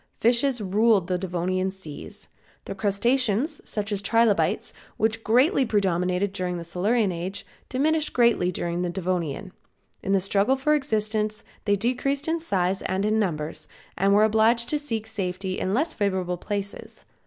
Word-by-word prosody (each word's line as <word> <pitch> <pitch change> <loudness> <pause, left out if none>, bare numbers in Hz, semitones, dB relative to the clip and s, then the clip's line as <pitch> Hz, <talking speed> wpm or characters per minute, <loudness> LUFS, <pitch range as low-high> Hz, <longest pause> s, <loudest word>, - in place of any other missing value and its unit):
Fishes 245 +2 +3
ruled 205 0 +3
the 180 0 -1
Devonian 185 +1 -1
seas. 190 -6 -10 0.4
The - - -5
crustaceans, 235 - +1
such 210 0 -1
as 200 -1 -1
trilobites 225 0 +2 0.2
which 225 +1 0
greatly 265 - +4
predominated 190 -3 0
during 180 -2 -2
the 170 - -5
Silurian 195 +5 +1
age, 185 +4 -5 0.2
diminished 305 +4 +1
greatly 235 -7 +3
during 175 0 -2
the 180 - -1
Devonian. 180 -1 -3 0.5
In 195 - -2
the 195 - +4
struggle 200 +6 +2
for 270 +3 +1
existence 215 -6 -1 0.2
they 205 -1 +3
decreased 255 +7 -1
in 330 +1 0
size 190 - 0
and 190 +2 -1
in 215 +1 +2
numbers, 160 -6 -3 0.3
and 195 +2 +2
were 205 +1 +5
obliged 220 +2 +3
to 300 - +1
seek 225 -7 -4
safety 190 -3 -3
in 190 +2 -1
less 315 +5 +1
favorable 185 -3 -1
places. 200 +2 -6
205 Hz, 155 wpm, -25 LUFS, 185-235 Hz, 0.5 s, were